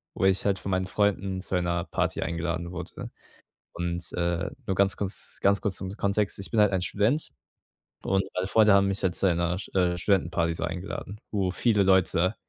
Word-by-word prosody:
wo - - 0
ich 95 0 +3
halt 100 -2 +1
von 95 - -4
meinen 95 0 0
Freunden 100 -2 0
zu 95 - -3
einer 85 -1 0
Party - - -1
eingeladen 85 +1 -3
wurde. 90 -1 -7 0.6
Und, 85 -1 -4
äh, 85 -1 -1 0.2
nur 95 - 0
ganz 100 -2 +3
kurz 100 -1 -2
ganz 100 0 +3
kurz 100 -3 -1
zum 95 0 -4
Kontext, 100 -1 0
ich 100 - -7
bin 115 - -1
halt 105 -2 +4
ein 90 -1 0
Student 110 - 0 0.7
und 95 0 +1
meine 90 +1 -1
Freunde 110 0 +5
haben 100 0 +4
mich 100 0 -2
halt 90 -2 +1
zu - - +1
einer 85 0 +1
St 100 - -10
äh, 90 -2 +2
Studentenparty 85 -3 +1
so 80 - -4
eingeladen, 90 +4 -5
wo 95 -3 0
viele 105 +1 +2
Leute 95 0 +3
95 Hz, 195 wpm, -27 LUFS, 85-100 Hz, 0.7 s, Freunde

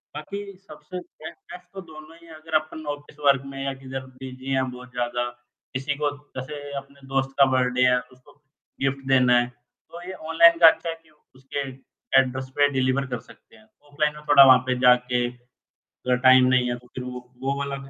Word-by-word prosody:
बाकी 200 +5 -7
सबसे 170 +4 -9
best 165 -2 -12
best 180 0 -11
तो 195 - -7
दोनों 160 -1 -13
ही - - -17
है 165 - -12
अगर 155 0 -6
अपन 155 0 -11
ऑफ़िस 145 +1 -19
वर्क 140 -1 +4
में 135 0 -5
या 135 0 -2
किधर 130 0 -6 0.2
बिजी 130 0 -8
है 130 0 +2
बहुत 125 0 -12
ज़्यादा 120 0 -2 0.5
किसी 135 +3 -2
को 145 - +2 0.3
जैसे 145 +2 -7
अपने 140 0 -10
दोस्त 135 0 0
का 140 - +8
बर्थडे 125 -1 +1
है 125 0 +3
उसको 125 0 -17 0.5
गिफ्ट 135 0 -2
देना 125 -2 +5
है 120 - 0
तो 125 +7 -16
ये 190 - -6 0.2
ऑनलाइन 170 +1 +7
का 165 - +9
अच्छा 165 - +3
है 165 - -3
कि 160 - -25 0.3
उसके 135 +1 -5 0.5
एड्रेस 130 0 -2
पे 145 0 +4
डिलीवर 130 +1 +1
कर 125 -2 -4
सकते 120 - -19
हैं। 220 - -20 0.3
ऑफलाइन 150 +1 0
में 150 - -12
थोड़ा 140 -1 +9
वहाँ 130 -1 +8
पे 130 - +1
जाके 125 0 +3 0.6
अगर 125 0 -2
टाइम 130 0 +8
नहीं 125 -1 +3
है 120 - -1
तो 125 0 -19
फिर 125 - -5
वो 125 0 -6 0.2
वो 135 +1 0
वाला 140 0 -3
में 135 0 -11
135 Hz, 205 wpm, -24 LUFS, 125-150 Hz, 0.6 s, का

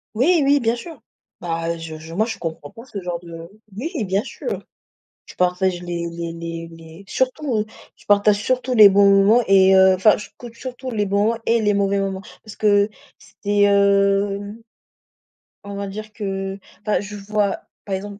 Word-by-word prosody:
Oui 315 +7 +3
oui 285 +1 +4
bien 235 -1 +1
sûr. 300 +3 -10 0.4
Bah, 165 0 -3
je 160 -1 -8
je 160 +1 -11
moi 215 +3 +2
je 225 -3 -5
comprends 160 -4 -6
pas 230 - -12
ce 215 -6 -7
genre 175 -1 -4
de 165 -1 -10 0.3
oui 290 - -3
bien 195 +4 0
sûr. 465 - -6 0.6
Je - - -13
partage 180 0 0
les 170 -1 -4
les 170 0 -5
les 165 0 -6
les 165 +3 -13
surtout, 255 -4 -1 0.3
je - - -23
partage 205 0 +3
surtout 255 0 0
les 210 -2 +9
bons 200 +1 +5
moments 200 +5 +5
et 190 -1 +6
heu, 190 0 +6
enfin 210 +3 +4
je 210 - -9
compte 240 -2 -10
surtout 255 +1 -7
les 210 -2 0
bons 205 +4 +1
et 230 0 +2
les 205 -1 +2
mauvais 200 0 +1
moments. 195 -1 -3 0.2
Parce 215 - -11
que 205 -1 +3 0.3
c'était, 205 0 -3
hem 200 +1 +2 1.0
on 200 0 -7
va 200 0 -4
dire 215 +2 -8
que, 195 -2 -4 0.2
enfin, 210 -3 0
je 205 +1 -7
vois, 205 0 -1 0.2
par 195 -2 -2
exemple, 200 +1 -7
200 Hz, 180 wpm, -21 LUFS, 190-215 Hz, 1.0 s, les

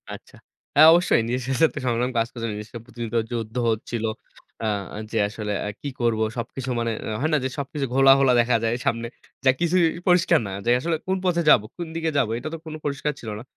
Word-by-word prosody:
আচ্ছা। - - -10 0.4
হ্যাঁ 155 +2 +9
অবশ্যই 175 -8 +3
নিজের 125 +1 -1 0.2
সাথে 160 - +7
তো - - -3
সংগ্রাম 120 +1 0
কাজ 115 0 +2
করছে। 115 -2 -5
জিনিসটা 105 +3 -7
প্রতিযোগিতা 120 -1 -3
যুদ্ধ 115 -1 -4 0.2
হচ্ছিল। 115 +1 -3 0.6
আ - - -1 0.5
যে 115 - -2
আসলে 105 -1 -5 0.2
আ - - -2
কি 145 - -4
করব, 115 -2 +1 0.2
সবকিছু 125 +2 -5
মনে 115 0 -1 0.3
হয় 155 - +1
না - - +5
যে - - 0
সবকিছু 140 0 -3
ঘোলা, 135 0 +7
ঘোলা 135 -2 +4
দেখা 120 0 +3
যায় 115 0 +1
সামনে। 115 0 0 0.4
যা 130 - +7
কিছুই 175 +1 +3 0.2
পরিষ্কার 175 -1 +4
না। - - -6
যে - - +1
আসলে 165 +5 -1
কোন 190 - +1
পথে 175 -2 +2
যাবো, 105 -7 +6
কোন 175 -1 -5
দিকে 165 -1 -1
যাবো? 120 -6 +1
এটা 125 - -6
তো - - -3
কোনো 155 -1 -6
পরিষ্কার 145 +1 -1
ছিল 115 - -7
না। - - -9
125 Hz, 210 wpm, -24 LUFS, 115-155 Hz, 0.6 s, হ্যাঁ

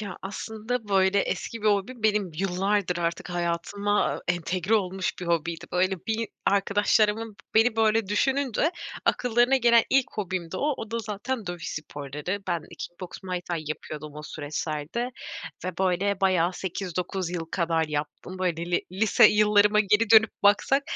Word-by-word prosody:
Ya, 200 -4 -6
aslında, 220 +3 -4
böyle, 190 0 +3
eski 230 +2 -3
bir - - 0
hobim 210 +4 0
benim 210 -3 +2
yıllardır 195 0 0
artık 170 +1 -2
hayatıma 175 +4 0
entegre 180 +3 0
olmuş 190 -3 0
bir 180 - -5
hobiydi. 170 0 -1
Böyle, 185 0 0
bir 225 0 -1 0.2
arkadaşlarımın 210 +2 +2 0.2
beni, 225 +1 +4
böyle, 225 -1 +3
düşününce 265 - +1 0.3
akıllarına 245 +2 +3
gelen 235 -2 +5
ilk 270 -1 +4
hobimdi 185 -4 -3
o. 290 +7 0
O 225 - -7
da 230 - -1
zaten 220 +2 -4
dövüş 175 -2 -5
sporları. 150 +5 -5
Ben 170 -3 0 0.2
kick 175 - -8
boks, 180 -2 -8
muay 185 -1 -3
thai 170 -3 -4
yapıyordum 155 0 -6
o 150 - -8
süreçlerde 155 +8 -4 0.6
ve 180 -1 -4
böyle 190 +1 +1
bayağı 185 -2 +3
8-9 185 0 -3
yıl 175 -2 -3
kadar 165 -2 +1
yaptım. 150 +5 -5
Böyle 170 -2 -1
li 175 - +1
lise 215 +4 +5
yıllarıma 210 0 +4
geri 210 +2 +2
dönüp 220 -1 +7
baksak 205 +7 +4
195 Hz, 150 wpm, -26 LUFS, 175-215 Hz, 0.6 s, dönüp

